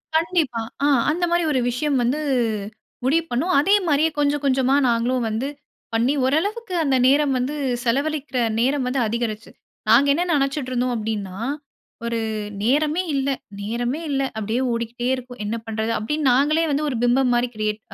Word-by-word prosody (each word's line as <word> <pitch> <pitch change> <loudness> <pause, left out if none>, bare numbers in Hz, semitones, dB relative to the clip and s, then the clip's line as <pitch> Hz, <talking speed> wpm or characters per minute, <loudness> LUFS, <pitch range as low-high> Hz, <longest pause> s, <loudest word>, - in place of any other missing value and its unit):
கண்டிப்பா. 320 -8 +1 0.2
ஆ - - +4 0.2
அந்தமாரி 345 +1 +1
ஒரு 260 - +2
விஷயம் 275 +3 0
வந்து 255 +6 0 0.8
முடிவு 315 +6 +2
பண்ணோம். 330 +10 0
அதேமாரியே 320 -4 +3
கொஞ்சம், 290 0 +1
கொஞ்சமா 265 0 +3
நாங்களும் 240 +1 +1
வந்து 220 +5 -2 0.5
பண்ணி 235 +5 +2
ஓரளவுக்கு 400 - -1
அந்த 275 -3 +2
நேரம் 280 +1 +3
வந்து 260 +4 -2 0.3
செலவழிக்கிற 280 +2 -1 0.2
நேரம் 265 +2 +1
வந்து 260 +1 0
அதிகரிச்சு. 225 -1 -3 0.4
நாங்க 240 +6 +6
என்ன 335 +5 +1
நினைச்சிட்டு 275 -1 -1
இருந்தோம் 250 0 0
அப்பிடின்னா, 210 -4 -4 0.7
ஒரு 235 0 -1 0.4
நேரமே 300 +8 +2
இல்ல 275 0 0 0.3
நேரமே 240 +7 -2
இல்ல. 275 -1 0 0.2
அப்பிடியே 220 +4 -1
ஓடிக்கிட்டே 235 +1 -3
இருக்கும். 250 0 -10
என்ன 215 +3 -2
பண்றது? 220 0 -2
அப்பிடின்னு 295 +6 0
நாங்களே 295 +6 +3
வந்து 285 +2 0
ஒரு 265 - -3
பிம்பம்மாரி 245 0 +3
கிரியேட் 215 0 -2
265 Hz, 145 wpm, -22 LUFS, 235-295 Hz, 0.8 s, நாங்க